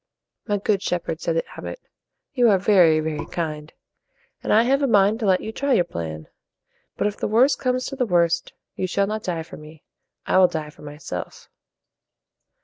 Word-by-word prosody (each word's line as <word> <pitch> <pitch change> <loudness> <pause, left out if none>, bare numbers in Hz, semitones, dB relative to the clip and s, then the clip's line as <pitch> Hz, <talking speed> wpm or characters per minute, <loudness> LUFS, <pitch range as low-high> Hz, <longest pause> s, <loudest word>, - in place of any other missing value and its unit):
"My 205 -2 +1
good 200 -1 0
shepherd," 175 -4 -3
said 165 - -1
the 165 - +1
abbot, - - -7 0.5
"you 245 -3 +4
are 200 - +5
very, 180 -5 +4
very 155 -1 -4
kind; 155 -2 -4 0.7
and - - -3
I 220 +2 +6
have 270 +3 +2
a 275 - +2
mind 210 -1 +3
to 220 - -1
let 185 -1 +3
you 220 - -5
try 280 +4 0
your 185 - +4
plan. 80 - -6 0.7
But - - 0
if 210 0 -1
the - - -2
worst 245 +7 +3
comes 255 -1 0
to 275 - -5
the 250 -3 -1
worst, 170 -2 +1 0.2
you 185 - -2
shall 200 +2 +1
not 215 +2 -3
die 170 -5 -3
for 170 +3 -11
me. 155 0 -14 0.4
I - - +3
will 185 - +7
die 155 -3 -5
for - - -19
myself." 145 - -8
185 Hz, 195 wpm, -23 LUFS, 160-220 Hz, 0.7 s, will